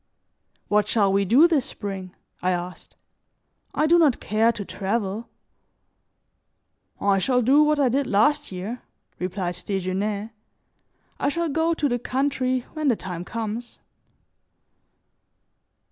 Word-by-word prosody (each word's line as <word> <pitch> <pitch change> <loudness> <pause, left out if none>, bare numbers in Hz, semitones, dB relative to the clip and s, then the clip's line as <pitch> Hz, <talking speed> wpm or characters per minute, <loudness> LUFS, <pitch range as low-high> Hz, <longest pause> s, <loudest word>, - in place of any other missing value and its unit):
"What 210 0 +2
shall 200 -3 +2
we 200 0 +2
do 265 - +6
this 310 -7 +1
spring?" 195 -3 -6 0.3
I 180 - +1
asked. 180 0 -4 0.8
"I 305 - +2
do 340 +2 +5
not 295 -7 +4
care 220 +2 +2
to 210 -3 -6
travel." 205 +3 -3 1.7
"I 200 -1 +2
shall 250 +5 +2
do 275 +6 +5
what 300 0 +3
I 275 - +4
did 270 +3 0
last 290 +8 +2
year," 195 +7 -5 0.4
replied 180 -1 -3
Desgenais. 200 +3 -2 0.9
"I - - +1
shall 335 +2 -1
go 320 +3 +1
to 300 - +1
the 245 -2 -1
country 255 0 0
when 310 -2 -2
the 250 - +4
time 180 -4 -6
comes." 230 +3 -5
225 Hz, 130 wpm, -24 LUFS, 195-275 Hz, 1.7 s, do